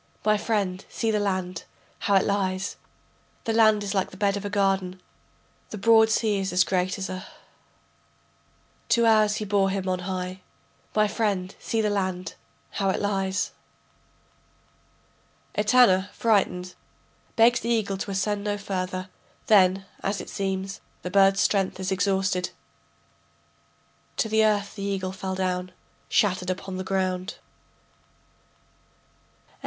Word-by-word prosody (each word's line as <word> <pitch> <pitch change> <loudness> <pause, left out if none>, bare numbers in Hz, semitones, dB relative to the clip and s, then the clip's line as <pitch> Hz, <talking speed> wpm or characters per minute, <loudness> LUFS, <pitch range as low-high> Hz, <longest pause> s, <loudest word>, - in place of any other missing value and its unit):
My 215 0 +4
friend 205 -3 -1
see 225 -1 -1
the 210 - +1
land, 185 -3 -2 0.3
how 200 - +1
it 190 - +4
lies, 195 -1 -1 0.7
The 225 - -1
land 215 -2 +4
is 200 0 -3
like 190 -2 0
the 185 - -13
bed 200 0 +1
of 200 - -4
a 205 - -3
garden, 195 -2 0 0.7
The 215 - -6
broad 220 +1 +5
sea 220 -2 +1
is 195 0 -2
as 180 +1 +4
great 185 0 0
as 195 0 -3
a 185 +1 -6 0.9
[.] - - -37
Two 235 -1 +4
hours 215 -2 +4
he 215 - -3
bore 200 -1 +2
him 190 -1 -2
on 185 -1 0
high. 185 0 -4 0.5
My 215 0 +4
friend 200 -3 -1
see 225 - -1
the 210 -1 +1
land, 185 -3 -2 0.4
how 195 -1 0
it - - 0
lies. 195 -1 -1 2.0
[Etana, 210 -3 +4
frightened, 185 -5 +1 0.6
begs 235 +1 +5
the 235 - -4
eagle 215 -4 0
to 195 - -5
ascend 200 +1 -1
no 205 0 -1
further; 185 -2 -4 0.4
then, 190 -2 +4 0.2
as 195 0 -1
it - - -8
seems, 195 +1 -3 0.2
the 180 - -4
bird's 195 0 +5
strength 195 -2 +1
is 190 0 -2
exhausted.] 190 -1 +1 1.7
To - - +1
the 220 0 +3
earth 205 -2 +1
the 200 - -8
eagle 195 -2 -2
fell 190 0 -4
down 185 -1 -2 0.4
Shattered 185 -3 +1
upon 185 0 -4
the 185 - -3
ground. 185 -1 -1 2.1
VII. - - -32
195 Hz, 145 wpm, -25 LUFS, 185-210 Hz, 2.1 s, broad